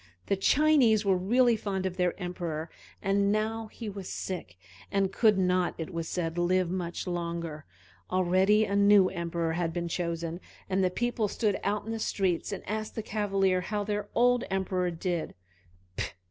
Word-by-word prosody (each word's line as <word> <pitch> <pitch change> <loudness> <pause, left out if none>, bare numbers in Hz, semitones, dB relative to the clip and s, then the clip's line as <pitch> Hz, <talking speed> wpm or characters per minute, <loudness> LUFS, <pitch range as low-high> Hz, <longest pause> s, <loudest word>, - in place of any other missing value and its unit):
The 200 - +1
Chinese 240 -1 +4
were 195 -1 +4
really 235 +6 +3
fond 195 -3 -3
of 185 -1 -2
their 180 -1 0
Emperor, 170 -3 -4 0.3
and 200 +1 +2
now 220 +1 -1
he 225 +1 -8
was 195 -2 -6
sick, 170 - -5 0.3
and 195 -1 +1
could 215 -4 +4
not, 180 -1 +1
it 165 +3 -5
was 165 -1 -3
said, 170 -1 -2
live 180 0 +2
much 175 -2 -3
longer. 170 -3 -4 0.4
Already 185 +4 +3
a 200 - -2
new 200 -2 +6
Emperor 170 -1 -2
had 170 -1 -1
been 170 0 -3
chosen, 170 0 -3 0.3
and 190 0 +1
the 185 - +3
people 230 +2 -1
stood 205 0 0
out 205 +1 -1
in 225 - -4
the 225 - -3
street 190 -3 0
and 200 - -6
asked 215 +2 -3
the 220 - -3
Cavalier 195 -3 +1
how 205 +3 -2
their 205 0 -3
old 245 +1 +4
Emperor 185 -1 0
did. 170 0 -3
190 Hz, 170 wpm, -29 LUFS, 175-210 Hz, 0.4 s, new